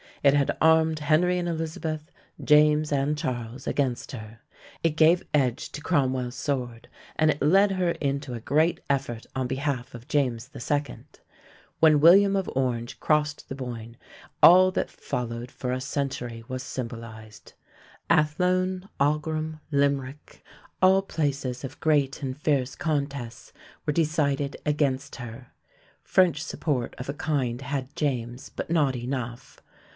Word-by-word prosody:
It 140 -1 +6
had 140 -1 +2
armed 160 0 +4
Henry 160 +4 +2
and 175 - -2
Elizabeth, 160 -1 -4 0.3
James 150 0 +4
and 145 +1 +1
Charles 125 -3 -4
against 130 -4 -1
her. 110 -1 -9 0.4
It 165 - +3
gave 165 +2 +5
edge 130 -4 0
to 150 - -7
Cromwell's 130 -6 0
sword, 125 -4 -3 0.3
and 155 0 +3
it 150 - -5
led 195 +7 +5
her 180 -2 +1
into 140 -3 -3
a 120 - -4
great 155 +8 +1
effort 130 -5 -1
on 130 -1 -1
behalf 130 -1 -3
of 120 +1 -11
James 130 -4 0
II. 145 +3 -2 0.8
When 155 -2 +6
William 195 +6 +7
of 195 -1 -1
Orange 120 -3 -1
crossed 150 -1 0
the 135 - -6
Boyne, 120 -3 -7 0.5
all 185 +2 +8
that - - -1
followed 120 0 -4
for 125 - -4
a 130 0 -2
century 130 -4 -3
was 130 -1 -4
symbolized. 115 -4 -8 0.6
Athlone, 180 +4 +1
Aughrim, 155 +2 0
Limerick, 140 0 -1 0.4
all 190 +1 +6
places 140 -8 -2
of 135 +1 -7
great 145 -3 +1
and 130 0 -3
fierce 140 -4 0
contests, 140 -6 -3 0.3
were 150 - 0
decided 145 -3 0
against 145 -2 0
her. 120 0 -9 0.5
French 175 -4 +3
support 135 -8 -2
of 130 +1 -7
a - - -1
kind 140 -7 -1
had 135 0 -4
James, 125 -4 -2
but - - -6
not 150 -6 +2
enough. 125 0 -5
140 Hz, 140 wpm, -26 LUFS, 125-155 Hz, 0.8 s, all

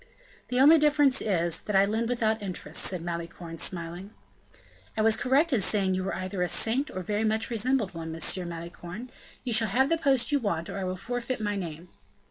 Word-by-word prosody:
"The 250 - 0
only 310 +4 +8
difference 295 -3 +4
is, 170 -5 0
that 210 - -3
I 195 +1 +6
lend 225 +3 -1
without 220 -3 0
interest," 180 -5 -4
said 180 -3 -2
Malicorne, 170 -1 -6
smiling. 175 +2 -1 0.9
"I 215 - +2
was 220 0 +5
correct 280 +5 +2
in 230 - +3
saying 195 -1 +2
you 185 0 -1
were 190 - -2
either 185 0 -4
a 180 - +1
saint 260 +7 +1
or 185 - -5
very 210 +4 -1
much 220 +2 0
resembled 230 -2 0
one. 165 -1 -6
M. 175 +2 -1
Malicorne, 170 +7 -8 0.3
you 250 -3 -2
shall 220 0 +3
have 265 +7 +2
the 330 - +2
post 275 -4 +2
you 290 - +3
want, 170 -8 -2
or - - -4
I 190 - -2
will 185 0 -2
forfeit 245 +5 -3
my 205 -1 -1
name." 170 -2 -6
205 Hz, 205 wpm, -28 LUFS, 175-245 Hz, 0.9 s, only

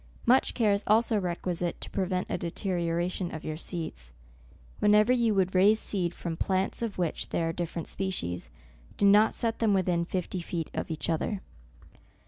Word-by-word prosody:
Much 255 +3 +4
care 215 -4 +3
is 200 +1 -1
also 220 0 +3
requisite 175 -1 -2
to - - -5
prevent 185 -1 -1
a - - -2
deterioration 175 0 -2
of 160 - -7
your 155 - -3
seeds. 155 - -5 0.7
Whenever 210 +3 +5
you 235 -4 +2
would 190 -1 +2
raise 200 +4 +5
seed 180 -6 -1
from 170 -2 -5
plants 190 +5 -1
of 230 -4 -3
which 175 -3 -2
there 165 -1 0
are - - -2
different 170 -1 -4
species, 90 - -3 0.5
do 205 - +2
not 205 +2 +6
set 230 -1 -1
them 215 -3 +3
within 180 -2 +1
fifty 180 +1 -3
feet 170 -2 -4
of - - -3
each 160 -1 -3
other. 180 +5 -1
185 Hz, 170 wpm, -28 LUFS, 170-205 Hz, 0.7 s, not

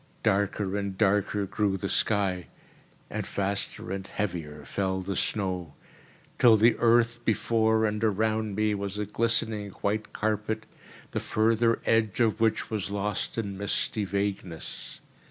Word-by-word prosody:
Darker 100 0 +1
and 100 -2 -3
darker 100 0 +2
grew 100 0 0
the - - -3
sky, 95 -4 +1 0.6
and - - -3
faster 100 -1 -2
and 95 0 -4
heavier 80 -7 -4
fell 95 +6 -1
the 95 +1 -3
snow, 90 -7 -1 0.6
till 115 -3 +7
the 115 +3 +5
earth 120 0 +3
before 110 0 +2
and 105 0 -1
around 110 0 +1
me 105 0 +2
was 100 0 -3
a 105 - -1
glistening 110 -1 +1
white 105 +1 -1
carpet 110 +1 -1 0.5
the - - -1
further 115 +1 +2
edge 110 -3 +2
of 110 -2 +2
which 115 +1 +1
was 105 -3 -2
lost 105 +2 -2
in 100 -3 -3
misty 100 +1 0
vagueness. 100 -3 -4
105 Hz, 135 wpm, -28 LUFS, 95-110 Hz, 0.6 s, till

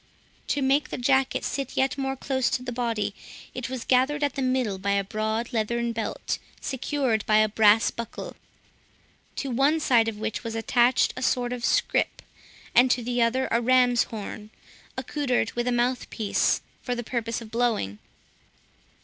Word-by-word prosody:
To 285 - 0
make 275 +2 +2
the - - -4
jacket 265 +1 +1
sit 275 -2 -3
yet 265 0 +2
more 270 -1 -2
close 260 -1 0
to 250 - -2
the 245 - -4
body, 230 -4 -1 0.4
it 255 0 -5
was 255 -2 -5
gathered 265 +4 +2
at 285 - +1
the 275 - -3
middle 255 -7 0
by 200 +1 0
a 200 0 +1
broad 220 +4 -2
leathern 235 +1 0
belt, 225 -1 -3 0.2
secured 265 -4 -1
by 215 - +5
a 215 0 +5
brass 215 +1 +4
buckle; 235 -1 -7 1.0
to 275 - -3
one 275 +6 +3
side 240 -6 +3
of 225 -2 -3
which 220 +2 -3
was 225 -1 -4
attached 240 +2 +3
a - - -6
sort 245 -1 +1
of 245 -1 -6
scrip, - - +1 0.5
and 250 +2 +6
to 245 -1 +1
the 245 +1 0
other 250 +3 +2
a 235 - +2
ram's 245 -1 +4
horn, 210 -1 -7 0.5
accoutred 260 -3 -1
with 240 +1 -2
a - - +2
mouthpiece, 240 -3 0 0.2
for 245 - -2
the 240 - -4
purpose 230 -1 -2
of 225 -2 -11
blowing. 225 - 0
240 Hz, 170 wpm, -26 LUFS, 225-260 Hz, 1.0 s, and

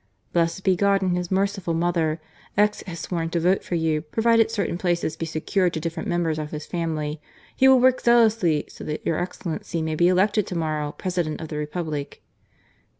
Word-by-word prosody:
"Blessed 170 +2 +1
be 190 -1 +3
God 200 +1 +2
and 180 -1 +1
His 180 -1 -3
Merciful 195 -3 0
Mother! 165 -2 0 0.4
X 210 0 +3
has 170 -2 -6
sworn 165 -1 -2
to 170 - 0
vote 180 +4 +2
for 175 - -3
you, 160 -2 +1
provided 225 +7 +2
certain 200 -6 -2
places 175 -3 0
be 165 0 -4
secured 175 +3 0
to - - -1
different 165 +1 -4
members 165 -3 0
of 150 -1 -4
his 150 -1 -6
family. 155 -3 -3 0.3
He 265 - +5
will 265 -1 +7
work 255 0 +4
zealously 220 -10 +3
so - - -11
that 150 0 -4
your 165 - 0
excellency 175 -1 -4
may 160 0 -2
be 170 +3 +3
elected 200 +3 +2
to 180 - -5
morrow 155 -2 -1
President 175 -4 -2
of 160 - -7
the 150 - -4
Republic." 150 -1 -4
170 Hz, 195 wpm, -24 LUFS, 160-190 Hz, 0.4 s, will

